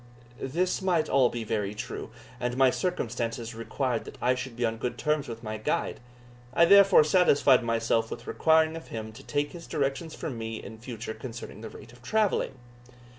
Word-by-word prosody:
This 175 +9 0
might 175 -4 +2
be - - -7
all 130 -2 +5
very 105 -3 -2
true, - - -6 0.3
and 125 +1 -2
my 130 -1 +5
circumstances 115 -8 -2
required 115 +1 -2
that - - -10
I 125 +1 +3
should 125 -1 -5
be 120 0 0
on 115 0 -1
good 125 - -3
terms 150 -2 0
with 115 0 -7
my 110 -1 -4
guide; 110 - -1 0.6
I 170 - +7
therefore 195 -2 +7
satisfied 145 -6 +4
myself 115 -1 +1
with - - -7
requiring 160 0 +3
of 165 - -8
him 110 -1 -6
to 115 +5 -12
take 145 +1 -1
his 170 -1 -10
directions 145 +3 -2
from 125 -6 -5
me 115 0 -4
in 110 0 -9
future 115 -1 -6
concerning 110 -1 -8
the 115 - -7
rate - - -13
of 120 - -17
travelling. 210 - +1
125 Hz, 185 wpm, -28 LUFS, 115-155 Hz, 0.6 s, I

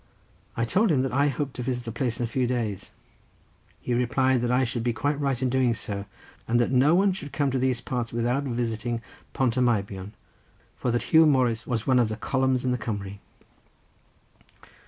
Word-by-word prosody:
I 115 - +1
told 200 - +2
him 130 -4 +2
that 130 -2 -2
I 140 +2 +3
hoped 140 0 -2
to - - -3
visit 125 0 -3
the 115 - -4
place 120 0 -2
in - - 0
a - - 0
few 125 +2 0
days. 115 -6 -3 0.9
He 125 - -3
replied 125 +1 +2
that 120 - 0
I 125 +2 +3
should 120 -1 -2
be 120 -1 0
quite 145 +5 -1
right 135 -4 0
in 130 - 0
doing 125 -2 +2
so, 100 -2 -5 0.4
and 120 +1 +2
that 120 - +1
no 135 +5 +4
one 195 +1 +3
should 145 -6 -7
come 145 -3 0
to 130 - 0
these 130 -2 0
parts 120 -3 -3
without 120 +3 0
visiting 115 -1 -2 0.3
Pont 130 -2 0
y - - +3
Meibion, 100 -4 -1 0.6
for - - -2
that 120 0 -1
Huw 160 0 +8
Morris 125 -5 +2
was 115 -3 -1
one 130 -2 +4
of 115 -3 +2
the 110 - -4
columns 130 +1 0
of 125 - +1
the 125 - -1
Cumry. 100 -3 -5
125 Hz, 205 wpm, -26 LUFS, 115-130 Hz, 0.9 s, Huw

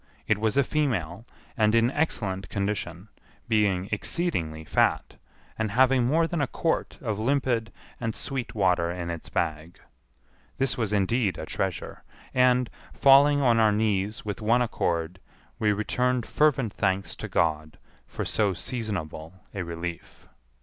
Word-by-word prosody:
It 105 +3 +1
was 110 +1 0
a 140 - +5
female, 115 - -2 0.3
and 110 0 +3
in 115 +2 +4
excellent 100 - -1
condition, 100 -2 -3 0.4
being 100 -4 +2
exceedingly 95 - -1
fat, - - +1 0.5
and 110 -1 0
having 130 +3 +4
more 160 +5 +3
than 165 -1 -2
a 140 - +1
quart 160 +5 -1
of 110 -4 -2
limpid 120 -2 0 0.3
and 115 -1 -3
sweet 130 -3 -5
water 90 -4 +2
in 85 -1 -4
its 85 -1 -7
bag. 80 +2 -3 0.8
This 135 -1 +1
was 110 -4 -1
indeed 105 +1 +1
a - - -5
treasure; 95 +1 -4 0.3
and, 125 -1 +4 0.3
falling 140 +1 +6
on 120 -3 +4
our 110 -1 +5
knees 105 -1 0
with 105 -2 -4
one 120 +3 +3
accord, 85 -5 -2 0.4
we 105 -1 +3
returned 125 +4 0
fervent 135 -8 +2
thanks 95 -2 -1
to - - -5
God 80 -1 0 0.3
for - - -5
so 100 -4 +1
seasonable 90 -6 -5 0.2
a 100 - -3
relief. 85 0 -7
105 Hz, 145 wpm, -26 LUFS, 90-125 Hz, 0.8 s, falling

